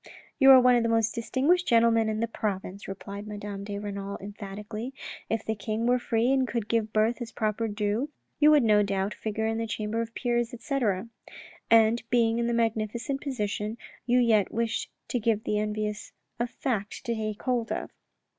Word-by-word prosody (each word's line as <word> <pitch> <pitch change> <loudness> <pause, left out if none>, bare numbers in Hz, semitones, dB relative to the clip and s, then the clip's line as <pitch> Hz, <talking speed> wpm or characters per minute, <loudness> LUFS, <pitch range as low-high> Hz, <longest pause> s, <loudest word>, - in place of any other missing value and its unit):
" - - -29
You 270 -1 +7
are 265 -1 +11
one 250 0 +5
of 240 - +3
the 230 - 0
most 225 -1 +2
distinguished 275 +9 +1
gentlemen 230 -1 +4
in 215 0 -2
the 230 - +1
province," 200 -3 -4
replied 200 +1 -7
Madame 205 -1 -6
de 200 0 -5
Renal 200 -1 -5
emphatically. 210 +4 -7 0.2
" - - -14
If 225 -1 -1
the 220 - 0
king 220 +1 -3
were 250 +1 +3
free 235 +1 +1
and 265 -1 +2
could 230 -4 -2
give 225 -2 0
birth 220 +3 +1
its 230 -1 -5
proper 215 +1 -1
due, 210 +5 -1 0.3
you 300 0 +7
would 300 -3 +6
no 210 -2 +5
doubt 195 0 -1
figure 220 0 -3
in 225 0 -1
the 230 - -2
Chamber 215 +1 -2
of 230 0 -6
Peers, 240 -1 -1
etc. 230 -6 -1 0.6
And 225 +1 +5
being 235 -1 +3
in 235 - 0
this 235 - 0
magnificent 230 +4 -1
position, 215 -5 -3 0.3
you 245 +1 +4
yet 225 -5 +3
wish 230 0 -1 0.2
to 245 - 0
give 220 -1 +1
the 210 -3 0
envious 210 0 -3 0.3
a 240 - +1
fact 225 -4 -3
to 235 - 0
take 215 -2 -4
hold 245 -3 0
of." - - -3
225 Hz, 195 wpm, -27 LUFS, 210-235 Hz, 0.6 s, are